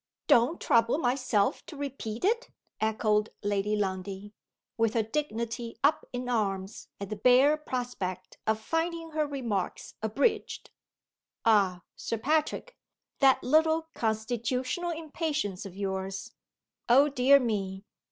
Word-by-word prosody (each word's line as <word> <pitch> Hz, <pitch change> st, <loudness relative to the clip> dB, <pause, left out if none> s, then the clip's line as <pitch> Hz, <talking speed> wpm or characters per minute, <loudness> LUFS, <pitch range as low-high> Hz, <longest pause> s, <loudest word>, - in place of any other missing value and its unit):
"Don't 280 Hz, +2 st, +4 dB
trouble 230 Hz, +3 st, +3 dB
myself 250 Hz, -7 st, +1 dB
to 305 Hz, -, -9 dB
repeat 265 Hz, -3 st, -4 dB
it?" 465 Hz, +4 st, +1 dB, 0.3 s
echoed 215 Hz, -1 st, +1 dB
Lady 205 Hz, +1 st, 0 dB
Lundie 195 Hz, 0 st, -3 dB, 0.4 s
with 225 Hz, -1 st, +1 dB
her 225 Hz, -, +3 dB
dignity 235 Hz, -2 st, -3 dB
up 290 Hz, +2 st, +3 dB
in 245 Hz, 0 st, -4 dB
arms 195 Hz, -4 st, -2 dB
at 200 Hz, 0 st, -6 dB
the -, -, -1 dB
bare 255 Hz, +7 st, +5 dB
prospect 240 Hz, -11 st, -5 dB
of 220 Hz, 0 st, +2 dB
finding 330 Hz, +4 st, -2 dB
her 305 Hz, -1 st, 0 dB
remarks 235 Hz, -10 st, -3 dB
abridged. 220 Hz, -, -1 dB, 0.7 s
"Ah, 195 Hz, -6 st, +3 dB
Sir 230 Hz, -, -3 dB
Patrick! 310 Hz, -, 0 dB, 0.4 s
that 270 Hz, -2 st, +5 dB
little 320 Hz, +3 st, +3 dB
constitutional 240 Hz, -, -1 dB
impatience 310 Hz, -, -3 dB
of 190 Hz, 0 st, -12 dB
yours! 190 Hz, -1 st, -4 dB, 0.6 s
Oh, 270 Hz, +5 st, +7 dB
dear 280 Hz, 0 st, +5 dB
me! 195 Hz, -6 st, -2 dB
235 Hz, 120 wpm, -29 LUFS, 205-285 Hz, 0.7 s, Oh